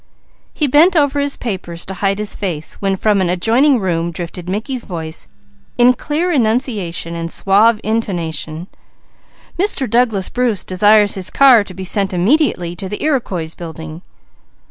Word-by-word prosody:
He 300 - 0
bent 310 +7 +5
over 285 -2 +2
his 285 0 -1
papers 185 -7 -5
to 190 - -6
hide 195 +1 -1
his 210 0 -2
face 170 -6 -4
when 195 -1 0
from 205 0 +1
an 180 - 0
adjoining 235 +10 +3
room 170 -3 -1
drifted 175 +1 -7
Mickey's 230 +5 -3
voice 160 - -6 0.5
in 245 +1 +6
clear 315 +7 -2
enunciation 220 - -1
and 165 0 -4
suave 210 +3 +3
intonation: 170 -7 -3 0.9
"Mr. 370 -9 +1
Douglas 225 -4 +1
Bruce 245 -5 -1
desires 205 +2 +3
his 190 -2 -3
car 260 -6 +6
to 185 -2 -11
be 190 - -6
sent 195 0 -1
immediately 180 - +1
to 190 +1 -5
the 210 - -5
Iroquois 195 - -1
Building." 160 -1 -8
200 Hz, 150 wpm, -17 LUFS, 175-245 Hz, 0.9 s, in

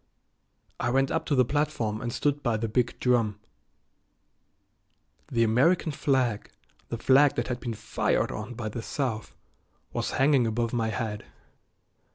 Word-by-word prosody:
I 120 - 0
went 135 +2 +2
up 160 - -1
to 145 - +2
the 130 -1 +4
platform 120 -7 -1
and 120 - -3
stood 145 +3 0
by 120 -4 0
the 115 +1 -2
big 120 +2 0
drum. 115 -5 +1 1.9
The 115 -3 +3
American 140 +10 +3
flag, 130 -6 0 0.4
the 115 - -3
flag 135 +4 +5
that 120 +1 -2
had 125 -1 -2
been 120 -3 -4
fired 105 +2 0
on 110 +3 -6
by 110 -2 -4
the 115 +2 -5
South, 115 -3 -3 0.6
was - - -2
hanging 135 -3 +4
above 115 +1 -1
my 115 -2 +1
head. 110 -2 -3
120 Hz, 150 wpm, -27 LUFS, 110-135 Hz, 1.9 s, flag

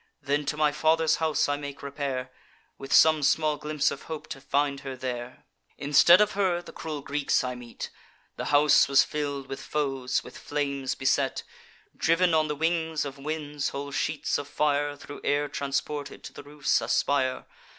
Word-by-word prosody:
Then 145 0 -1
to 150 - -1
my 150 -1 +3
father's 160 +1 +2
house 160 -1 +1
I 145 0 0
make 140 -1 -8
repair, 140 -2 -4 0.5
With 135 0 -8
some 155 +1 +6
small 150 +1 +2
glimpse 150 0 0
of 140 - -6
hope 160 -2 -5
to 135 - -7
find 140 0 0
her 135 -1 -6
there. 125 -1 -6 0.3
Instead 145 +6 +6
of 210 - +3
her, 190 -3 +1
the 175 - -12
cruel 155 -3 -5
Greeks 140 0 0
I 125 0 -2
met; 120 -1 -8 0.5
The - - -5
house 145 0 +5
was 140 0 +5
fill'd 145 -2 -3
with 135 0 -7
foes, 135 -4 -1
with - - -11
flames 140 -2 -2
beset. 130 - 0 0.5
Driv'n 170 +1 +2
on 155 -1 +3
the 150 - -2
wings 160 0 0
of 140 0 -7
winds, 150 -1 -3
whole 140 +1 -5
sheets 150 +1 -1
of 145 - -6
fire, 145 0 0
Thro' 145 0 -10
air 145 +1 +1
transported, 140 +1 -3
to - - -9
the - - -9
roofs 145 -1 0
aspire. 130 -2 0
145 Hz, 175 wpm, -27 LUFS, 140-150 Hz, 0.5 s, some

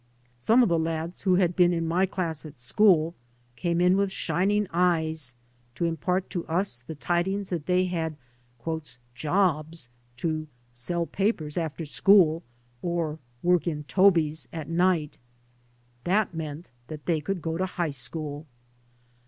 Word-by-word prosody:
Some 225 - +5
of 230 - +2
the 170 -1 +2
lads 165 +1 -3
who 185 -2 +3
had 180 -2 +2
been 175 -1 +5
in 165 -1 -1
my 180 +4 +2
class 170 -5 -3
at 150 -4 -11
school 165 - +4 0.4
came 170 +5 0
in 180 +1 +5
with 200 0 +1
shining 205 +3 +1
eyes 160 -6 +1 0.4
to 170 - -1
impart 180 +3 0
to 175 - -2
us 165 -6 +1
the 125 +7 -8
tidings 185 +6 -1
that 165 -4 -3
they 180 0 +3
had 165 -4 -2 0.5
" 125 -7 -5
jobs 155 -1 0
" 120 0 -37
to 155 +1 -2
" 120 - -37
sell 170 +8 -1
papers 175 -6 -1
after 165 -1 -3
school," 165 0 +5 0.4
or 165 -3 -2
" 120 - -36
work 180 0 +3
in 150 -3 -2
tobies 160 +1 +3
at 160 -3 -6
night." 170 -2 +1 0.8
That 195 +1 +1
meant 160 0 -6 0.2
that 150 -1 -8
they 165 -3 +1
could 190 +5 -2
go 165 +1 -2
to 185 - +1
high 175 -3 -2
school. 145 +3 -5
165 Hz, 160 wpm, -27 LUFS, 155-180 Hz, 0.8 s, Some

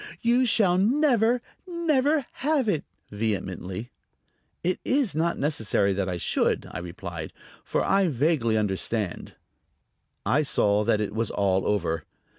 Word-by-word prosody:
"You 245 +2 +3
shall 195 -5 +3
never, 240 0 +3 0.2
never 310 -5 +1
have 285 -3 +1
it!" 165 -8 +1 0.3
vehemently. 100 0 -3 0.7
"It 180 +2 0
is 265 - +1
not 165 +3 0
necessary 110 -8 +1
that 95 -1 -1
I 90 - -2
should," - - 0
I - - -5
replied; 85 -2 -7 0.3
"for - - -1
I 195 -1 +3
vaguely 135 -6 +1
understand." 105 -1 -2 0.9
I 145 - +3
saw 105 -7 +2
that 110 -2 +2
it 105 -1 -3
was 115 0 -1
all 95 -2 +1
over. 85 -6 0
125 Hz, 130 wpm, -26 LUFS, -, 0.9 s, You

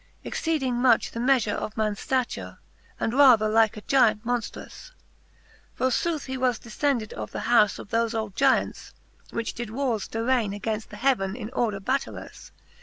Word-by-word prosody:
Exceeding 270 -7 -1
much 245 -3 +3
the 230 - -6
meafure 245 -4 +2
of 215 - -5
mans 215 -2 -1
ftature, 255 -2 -2 0.4
And 225 - -1
rather 250 -6 +6
like 220 0 +3
a - - -7
Gyant 230 -4 +3
monftruous. 245 - -5 0.8
For 260 - +1
footh 320 +3 -1
he 260 0 -4
was 250 -3 +1
defcended 235 -1 -2
of 105 -1 -6
the - - -5
hous 220 -4 +3
Of - - -10
thofe 230 0 0
old 220 -3 -3
Gyants, 270 -1 +1 0.4
which 230 -1 -3
did 240 -2 -5
warres 235 -3 -2
darraine 225 -3 0
Againft 220 0 -3
the 210 - -11
heaven 210 -5 +1
in 230 -2 -7
order 220 -6 -1
battailous. 255 +8 -4
230 Hz, 165 wpm, -25 LUFS, 215-260 Hz, 0.8 s, rather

